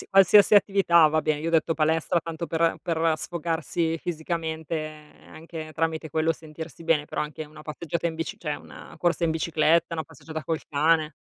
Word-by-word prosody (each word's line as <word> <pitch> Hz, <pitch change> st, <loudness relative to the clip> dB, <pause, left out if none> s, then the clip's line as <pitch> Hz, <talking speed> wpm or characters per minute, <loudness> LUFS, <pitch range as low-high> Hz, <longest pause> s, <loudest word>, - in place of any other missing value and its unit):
qualsiasi 200 Hz, +2 st, +7 dB
attività 195 Hz, -5 st, +5 dB
va 155 Hz, +1 st, +1 dB
bene, 150 Hz, -1 st, 0 dB
io 160 Hz, -, -3 dB
ho -, -, -1 dB
detto 165 Hz, 0 st, +2 dB
palestra 160 Hz, +2 st, +1 dB
tanto 165 Hz, 0 st, -6 dB
per 165 Hz, 0 st, +1 dB
per 165 Hz, -1 st, +1 dB
sfogarsi 165 Hz, 0 st, -2 dB
fisicamente 160 Hz, -1 st, -3 dB, 0.4 s
anche 160 Hz, -1 st, -9 dB
tramite 160 Hz, -1 st, -2 dB
quello 160 Hz, +2 st, +1 dB
sentirsi 160 Hz, -1 st, -10 dB
bene, 160 Hz, -3 st, +2 dB
però -, -, -3 dB
anche 150 Hz, +1 st, -5 dB
una 155 Hz, +1 st, -13 dB
passeggiata 165 Hz, +2 st, -3 dB
in 165 Hz, -, -5 dB
bici, 165 Hz, 0 st, -4 dB
cioè 150 Hz, -3 st, -3 dB
una -, -, -13 dB
corsa 175 Hz, 0 st, 0 dB
in 165 Hz, -, +2 dB
bicicletta, 165 Hz, +1 st, +2 dB
una 160 Hz, -1 st, -2 dB
passeggiata 160 Hz, -1 st, -8 dB
col 160 Hz, 0 st, -2 dB
cane. 155 Hz, +1 st, +2 dB
160 Hz, 175 wpm, -26 LUFS, 155-165 Hz, 0.4 s, qualsiasi